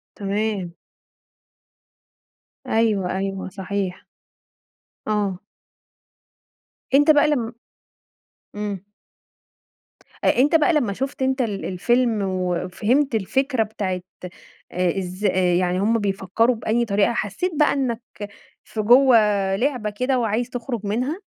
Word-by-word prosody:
تمام. 200 -3 -2 1.9
أيوه 205 -5 +1
أيوه 195 -1 -3
صحيح. 190 -1 -4 1.0
آه. 205 -4 -1 1.5
أنت 290 +3 +6
بقى 295 0 +4
لم 245 -6 -1 1.0
إمم. 205 -3 -4 1.4
أ - - +2
أنت 290 +5 +4
بقى 325 +2 +4
لمّا 245 -10 +1
شُفت 270 +5 -4
أنت 265 0 +1
ال 205 -4 -3
الفيلم، 230 +4 +1
وفهمت 190 +8 0
الفكرة 260 +4 +1
بتاعة 195 -4 -3 0.7
آآ 180 +1 0
إز 185 +2 -5
آآ، 185 -2 +2
يعني 180 +1 +1
هُم 225 +3 +2
بيفكّروا 205 +4 +1
بأي 230 +2 0
طريقة 205 +2 +2
حسّيت 230 - -2
بقى 300 - +4
إنك 255 -4 -1 0.6
في 215 - -4
جوه 245 +3 +6 0.4
لعبة 245 -2 -1
كده، 250 +5 0
وعايز 230 +2 -1
تخرج 240 -2 -4
منها؟ 250 - -2
215 Hz, 105 wpm, -22 LUFS, 195-250 Hz, 1.9 s, أنت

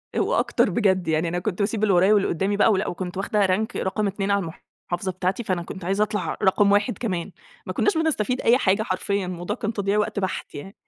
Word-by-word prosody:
آآ - - +1
وأكتر - - +1
بجد 190 -6 +1
يعني 160 +1 +1
أنا 175 +1 -1
كنت 180 +1 -3
باسيب 210 +1 -1
اللي 205 - +3
ورايا 185 +4 +5
واللي 205 -2 +3
قدامي 195 +4 -1
بقى 215 - +5
ولأ، 195 -1 0
وكنت 180 +1 -5
واخدة 200 +1 +1
rank 195 +4 -1
رقم 200 +2 -1
2 195 0 -2
على 200 - +3 0.5
المحافظة 180 +2 -2
بتاعتي، 185 +5 -2
فأنا 185 -5 -2
كنت 185 +1 -8
عايزة 195 +3 +2
اطلع 210 0 -3
رقم 200 +1 +4
1 205 +4 +2
كمان. 185 -8 -3 0.3
ما - - -4
كنّاش 410 - +1
بنستفيد 260 -6 0
أي 240 +2 +5
حاجة 205 -3 +2
حرفيًا 200 0 -1
الموضوع 175 -1 -4
كان 220 +1 -3
تضييع 200 -1 0
وقت 210 -1 0
بَحت 190 -3 -4
يعني. 190 +8 -8
195 Hz, 220 wpm, -24 LUFS, 185-210 Hz, 0.5 s, ورايا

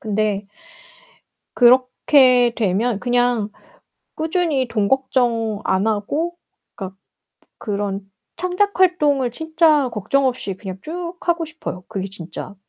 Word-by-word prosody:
근데 210 -1 -1 1.1
그렇게 255 0 +5
되면 215 +1 0
그냥 245 -3 +1 0.7
꾸준히 315 -5 0
돈 210 -4 0
걱정 235 -5 0
안 190 +3 +1
하고 285 +12 -1 0.4
그니까 190 -2 -7 0.6
그런 200 -2 -3 0.4
창작 365 +3 0
활동을 295 -9 +3
진짜 315 -1 +2
걱정 265 +6 0
없이 245 -6 -2
그냥 190 -1 -8
쭉 345 +4 -6
하고 340 -1 0
싶어요. 300 - -7
그게 195 -3 -4
진짜 185 0 -8
245 Hz, 220 characters per minute, -20 LUFS, 205-310 Hz, 1.1 s, 그렇게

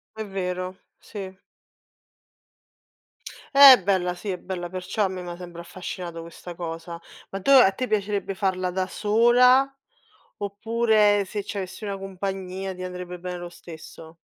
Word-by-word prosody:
È 220 - -4
vero, 185 -1 -4 0.2
sì. 190 -3 -9 2.2
È 275 -4 +10
bella, 180 -2 +1
sì, 180 +4 -7
è 185 - -2
bella, 180 -1 -5
perciò 185 +3 -2
a - - +2
me 185 -1 -6
m'ha 175 -1 -7
sempre 175 -1 -9
affascinato 175 -1 -7
questa 170 +1 -10
cosa. 170 0 -6 0.3
Ma 195 - -5
dove 270 +5 +7
a 190 - +4
te 255 +6 -4
piacerebbe 205 -2 -1
farla 185 -2 -1
da 185 0 -1
sola, 240 +6 +4 0.7
oppure 210 0 +2
se 205 +2 -4
c'avessi 195 +1 -6
una 200 -1 -4
compagnia 190 0 -5
ti 185 - -8
andrebbe 180 -1 -6
bene 180 0 -5
lo 175 0 -7
stesso? 165 -1 -12
190 Hz, 145 wpm, -25 LUFS, 180-205 Hz, 2.2 s, È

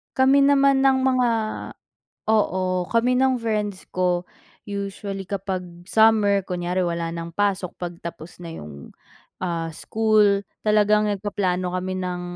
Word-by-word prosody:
Kami 265 +1 +5
naman 275 -1 +4
ng 265 -1 +4
mga 255 -2 +3 1.0
oo, 185 -4 +1
kami 235 +2 +2
ng 260 0 +2
friends 210 -4 -2
ko 180 -1 0 0.4
usually 200 -1 -5
kapag 190 -1 -3 0.2
summer 215 -3 +4
kunyari 180 0 -2
wala 170 -1 -2
ng 170 0 -5
pasok, 195 -1 0
'pag 175 -1 -5
tapos 170 0 -8
na 165 -1 -7
'yung, 75 - -10 0.5
ah, 170 -2 -2
school, 215 -1 +2 0.2
talagang 210 0 +3
nagpaplano 185 -3 -1
kami 185 +1 -2
ng 180 -1 -3
200 Hz, 125 wpm, -23 LUFS, 180-220 Hz, 1.0 s, Kami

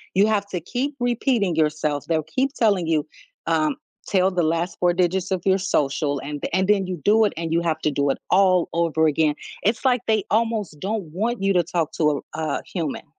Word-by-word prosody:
You 200 +3 +5
have 205 -2 0
to 185 - -3
keep 255 - -3
repeating 240 - +1
yourself. 150 -2 0
They'll 160 -2 +1
keep 260 - -1
telling 200 -7 +2
you, 155 -2 +1 0.4
um, 305 -2 +1 0.3
"Tell 190 -1 +2
the 180 - 0
last 165 +3 -1
4 175 -1 +3
digits 180 +1 0
of 185 -2 -1
your 190 0 +3
social." 145 -5 0
And 145 0 -5
the - - -4
and 190 0 +1
then 200 -3 +2
you 185 -1 -3
do 220 +2 +5
it, 205 - -1
and 165 -1 -3
you 170 - +2
have 165 -2 0
to 150 - +1
do 140 0 0
it 135 - 0
all 185 -2 +4
over 165 -1 +1
again. 150 0 +2 0.3
It's 220 +6 0
like, 250 -2 +3
they 220 -2 +2
almost 220 -8 0
don't 205 +3 -2
want 225 +4 -1
you 195 0 +3
to 180 - +4
talk 165 -1 -2
to - - +2
a - - -1 0.2
r 160 0 -2
a - - -11
human. 165 -6 -4
180 Hz, 225 wpm, -23 LUFS, 160-210 Hz, 0.4 s, You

